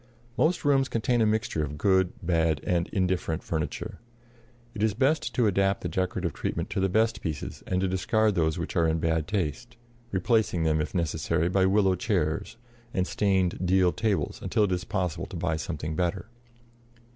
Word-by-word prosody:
Most 160 +4 +1
rooms 135 -2 +3
contain 120 +1 +1
a 110 - +4
mixture 110 -7 0
of 75 0 -5
good, 95 +1 +3
bad, 80 -3 +1
and 85 -1 0
indifferent 90 -4 -1
furniture. 80 -3 -4 0.7
It 105 - -6
is 110 -2 +2
best 145 +5 +1
to 120 - +3
adapt 100 -1 +2
the - - -2
decorative 90 -1 -2
treatment - - -3
to - - -1
the 95 0 +2
best 110 +4 +1
pieces 80 -4 -5
and 90 - 0
to 95 - +1
discard 105 +4 +1
those 80 -4 +1
which - - -4
are 85 -1 +3
in 80 0 +1
bad 80 -1 0
taste, 105 - -3 0.3
replacing 95 -2 +1
them, 80 -1 +2
if 75 - -4
necessary, 80 0 0
by 95 +1 +3
willow 95 -1 +3
chairs 80 +4 -1 0.4
and 90 - +2
stained 95 -3 +1
deal 90 0 +3
tables 105 +4 -1
until 105 - +1
it 100 - +1
is 90 0 -1
possible 90 -6 -2
to - - -9
buy 80 - 0
something 80 0 -4
better. 90 +1 -1
90 Hz, 180 wpm, -27 LUFS, 80-105 Hz, 0.7 s, a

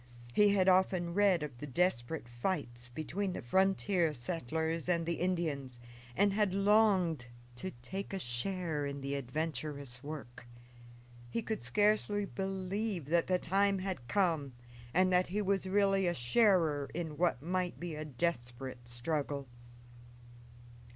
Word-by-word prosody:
He 210 +6 +6
had 190 -1 +3
often 185 -2 +3
read 195 -4 +4
of 135 -5 -7
the 150 - -6
desperate 140 -3 0
fights 120 -2 -3
between 180 +9 -3
the - - -4
frontier 190 - +2
settlers 160 +5 -2
and 170 -2 +2
the 170 0 -2
Indians, 155 -9 -1 0.4
and 200 +1 +3
had 205 -2 +1
longed 195 - +3 0.3
to 185 - -4
take 195 +10 -5
a 195 - -2
share 155 +2 -2
in 140 0 -5
the 140 +1 -3
adventurous 140 -1 -4
work. 135 -5 -8 0.8
He 225 - -2
could 220 -2 -3
scarcely 210 -1 +2
believe 195 -1 -3
that 170 0 +3
the 185 - +3
time 195 +3 +2
had 185 -10 -4
come 165 -8 +1 0.4
and 185 +4 +3
that 180 0 +4
he 195 +4 -2
was 195 -1 +1
really 195 -1 +3
a 175 - +1
sharer 155 - +3
in 160 -3 -3
what 165 -5 +1
might 180 +1 -1
be 175 -1 -4
a 155 0 -4
desperate 125 -4 -3
struggle. 140 +3 -2
170 Hz, 140 wpm, -33 LUFS, 140-190 Hz, 0.8 s, He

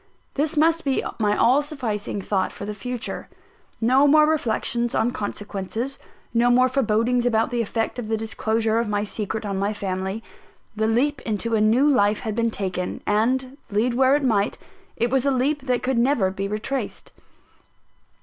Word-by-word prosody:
This 300 +2 -1
must 330 +2 +3
be 275 -2 0 0.2
my 210 -1 +2
all 255 +5 +4
sufficing 225 -9 -4
thought 190 -2 0
for 200 - -7
the 210 - -4
future. 245 +3 -5 0.5
No 260 +5 +4
more 305 +1 +6
reflections 240 -5 0
on 235 +2 +2
consequences, 210 +4 -4 0.3
no 240 +1 +3
more 255 +1 +5
forebodings 245 -1 +1
about 225 +1 +1
the 240 -1 0
effect 225 +2 -2
of 230 - -5
the 220 0 0
disclosure 220 0 0
of 230 -2 -1
my 205 0 0
secret 215 +1 -4
on 195 -1 -2
my 200 +2 0
family 190 +1 -3 0.5
the 220 0 +1
leap 275 +6 +1
into 225 +1 -2
a 220 - +3
new 230 +7 +4
life 210 -7 +3
had 220 -3 -3
been 230 0 +1
taken, 185 -4 -4
and, 255 +5 0
lead 225 +4 +1
where 260 +2 +4
it 290 - 0
might, 210 -6 +1 0.4
it 235 +1 0
was 265 -1 +2
a 280 - +2
leap 275 +2 0
that 250 -1 +1
could 255 -1 +1
never 235 -7 +2
be 195 +1 -3
retraced! 215 +6 -4
230 Hz, 175 wpm, -23 LUFS, 210-260 Hz, 0.5 s, more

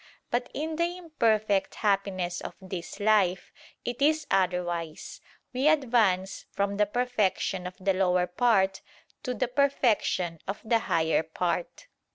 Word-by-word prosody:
But 245 +1 -1
in 315 +2 -3
the 345 +1 0
imperfect 215 - +1
happiness 195 -4 0
of - - -7
this 185 -3 -7
life, 200 -4 +2 0.3
it 240 +2 -4
is 305 +1 +3
otherwise; 175 -3 -1 0.3
we 260 +4 +1
advance 230 -11 +2
from 200 0 -1
the 210 0 +3
perfection 210 -5 0
of 180 - -9
the 195 +1 +1
lower 180 -1 +2
part 195 -1 +2 0.4
to 250 -1 -3
the 255 - 0
perfection 235 - +1
of 195 - -3
the 230 +1 +3
higher 160 -1 +2
part. 170 - -3
200 Hz, 135 wpm, -28 LUFS, 180-245 Hz, 0.4 s, is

